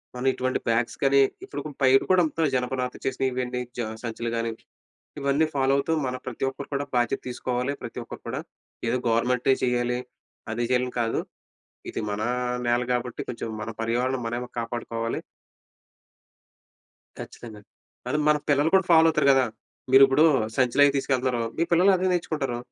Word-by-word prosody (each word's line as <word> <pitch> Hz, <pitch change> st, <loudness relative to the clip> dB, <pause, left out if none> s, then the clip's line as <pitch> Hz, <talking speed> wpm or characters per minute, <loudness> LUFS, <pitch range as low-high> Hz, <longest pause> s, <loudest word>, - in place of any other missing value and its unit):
మనం 125 Hz, +2 st, -2 dB
ఇటువంటి 130 Hz, 0 st, -1 dB
బ్యాగ్స్ 115 Hz, +1 st, 0 dB
కానీ 140 Hz, 0 st, +5 dB, 0.2 s
ఇప్పుడు 145 Hz, -, -6 dB, 0.2 s
బయట 130 Hz, 0 st, +6 dB
కూడా 185 Hz, -1 st, +5 dB
అంత 160 Hz, +1 st, -1 dB
జనపనాత 125 Hz, 0 st, -1 dB
చేసిన 135 Hz, 0 st, -1 dB
ఇవన్నీ 125 Hz, 0 st, -2 dB, 0.2 s
జ -, -, +1 dB, 0.2 s
సంచులు 115 Hz, 0 st, -3 dB
కానీ, 115 Hz, 0 st, -1 dB, 0.7 s
ఇవన్నీ 140 Hz, +3 st, +2 dB
ఫాలో 135 Hz, 0 st, +2 dB
అవుతూ 140 Hz, +4 st, -1 dB, 0.2 s
మన 125 Hz, -, -2 dB
ప్రతి 130 Hz, -1 st, -5 dB
ఒక్కరు 140 Hz, +1 st, -9 dB
కూడా 140 Hz, +1 st, -1 dB
బాధ్యత 120 Hz, -1 st, +1 dB
తీసుకోవాలి. 125 Hz, +2 st, -2 dB
ప్రతి -, -, -8 dB
ఒక్కరు -, -, -10 dB
కూడా. -, -, -3 dB, 0.5 s
ఏదో 120 Hz, -, +1 dB
గవర్నమెంటే 125 Hz, +3 st, +2 dB
చేయాలి. 125 Hz, 0 st, +1 dB, 0.5 s
అది 120 Hz, +2 st, -1 dB
చేయాలని 125 Hz, 0 st, +1 dB
కాదు. 115 Hz, -1 st, 0 dB, 0.7 s
ఇది -, -, -4 dB
మన 105 Hz, +1 st, -2 dB, 0.5 s
నేల 120 Hz, +1 st, +2 dB
కాబట్టి, 125 Hz, 0 st, -3 dB
కొంచెం 115 Hz, -1 st, -4 dB
మన 115 Hz, -, -4 dB
పర్యావరణం 125 Hz, +3 st, 0 dB
మనమే 120 Hz, +1 st, -4 dB
కాపాడుకోవాలి. 115 Hz, 0 st, -3 dB, 2.0 s
ఖచ్చితంగా. 110 Hz, -3 st, -9 dB, 0.5 s
అది 150 Hz, -, 0 dB
మన 150 Hz, -, +5 dB
పిల్లలు 145 Hz, +3 st, +3 dB
కూడా 190 Hz, -2 st, +5 dB
ఫాలో 165 Hz, -1 st, +7 dB
అవుతారు 155 Hz, -2 st, +1 dB
గదా! 135 Hz, -1 st, +4 dB, 0.5 s
మీరు 135 Hz, +1 st, +9 dB
ఇప్పుడు 135 Hz, +4 st, +4 dB, 0.3 s
సంచిలవీ 135 Hz, +2 st, +4 dB
తీసుకెళ్తున్నారు. 130 Hz, -3 st, 0 dB, 0.2 s
మీ -, -, 0 dB
పిల్లలు 180 Hz, +3 st, +5 dB
అదే 185 Hz, +1 st, -1 dB
నేర్చుకుంటారు. 150 Hz, -8 st, -1 dB
125 Hz, 150 wpm, -25 LUFS, 120-140 Hz, 2.0 s, మీరు